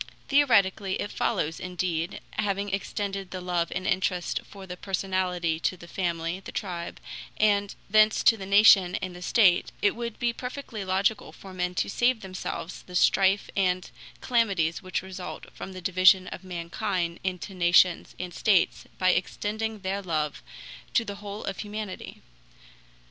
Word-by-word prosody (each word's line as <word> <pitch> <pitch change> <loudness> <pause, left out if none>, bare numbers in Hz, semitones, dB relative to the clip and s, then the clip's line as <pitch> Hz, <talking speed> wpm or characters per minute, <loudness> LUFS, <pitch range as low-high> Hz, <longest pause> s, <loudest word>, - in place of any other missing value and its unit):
Theoretically 205 -9 +3
it 205 - -3
follows, 160 +2 -1
indeed, 180 -2 -3
having 200 -1 -1
extended 195 -1 -3
the 185 - -5
love 175 -2 -1
and 185 +1 -3
interest 185 -2 0
for 195 -1 -10
the 180 -1 -7
personality 180 -3 -1
to 185 - -1
the 170 - -12
family, 170 -1 -2
the 195 - -9
tribe, 175 -4 -5 0.4
and 205 -1 +2
thence 215 +1 +4
to 225 - +6
the 195 -3 -8
nation 200 -3 +6
and 185 -1 -4
the 180 - -10
state, 185 -3 +4
it 205 - +2
would 235 -1 -5
be 240 -1 0
perfectly 250 -4 -6
logical 195 +3 0
for 190 -1 -12
men 180 0 -2
to - - 0
save 240 +2 +1
themselves 185 -2 -6
the 180 - -11
strife 195 +2 +3
and 185 -2 0 0.3
calamities 200 -10 +1
which 185 0 -3
result 190 -1 -7
from 190 - -8
the 185 - -8
division 185 +1 +5
of 180 - -8
mankind 175 0 -3
into 185 +1 -3
nations 175 0 +3
and 180 -1 -5
states 195 -2 +2
by 185 0 +4
extending 215 +4 -2
their 195 +1 -2
love 155 -5 -2 0.5
to 230 - +3
the 200 -1 -6
whole 205 +1 -7
of 195 - -4
humanity. 210 -2 -6
190 Hz, 155 wpm, -27 LUFS, 180-205 Hz, 0.5 s, to